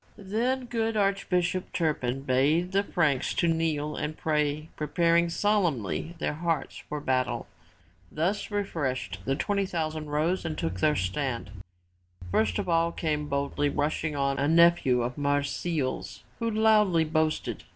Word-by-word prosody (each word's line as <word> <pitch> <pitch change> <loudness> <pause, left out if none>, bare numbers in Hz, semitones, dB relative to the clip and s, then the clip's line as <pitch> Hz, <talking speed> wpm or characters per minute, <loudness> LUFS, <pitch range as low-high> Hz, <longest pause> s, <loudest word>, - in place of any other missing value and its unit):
Then 235 +6 -1
good 225 -2 -1
Archbishop 185 -2 0
Turpin 135 -6 -1
bade 145 +7 +2
the 195 +1 +3
Franks 155 -9 0
to 170 - +2
kneel 160 -2 0
and 155 +1 -4
pray 150 0 0
preparing 170 +2 +2
solemnly 170 - 0
their 160 - -1
hearts 160 -2 -2
for 150 - -3
battle. 130 -3 0 0.7
Thus 180 +7 -1
refreshed 140 - -2
the 135 - +1
twenty 200 +5 0
thousand 155 -3 -3
rose 160 +5 0
and 160 -2 -4
took 90 +3 -3
their 150 +8 +3
stand. 120 +4 -2 0.8
First 100 -3 +2
of - - -2
all 165 0 +2
came 150 -3 -2
boldly 140 +1 0
rushing 150 +1 -1
on, 140 -1 0
a 140 - +2
nephew 165 -6 +4
of 125 +3 -4
Marsile's 145 0 -1 0.2
who 230 -1 0
loudly 210 -6 +4
boasted. 155 0 -1
155 Hz, 140 wpm, -28 LUFS, 140-180 Hz, 0.8 s, nephew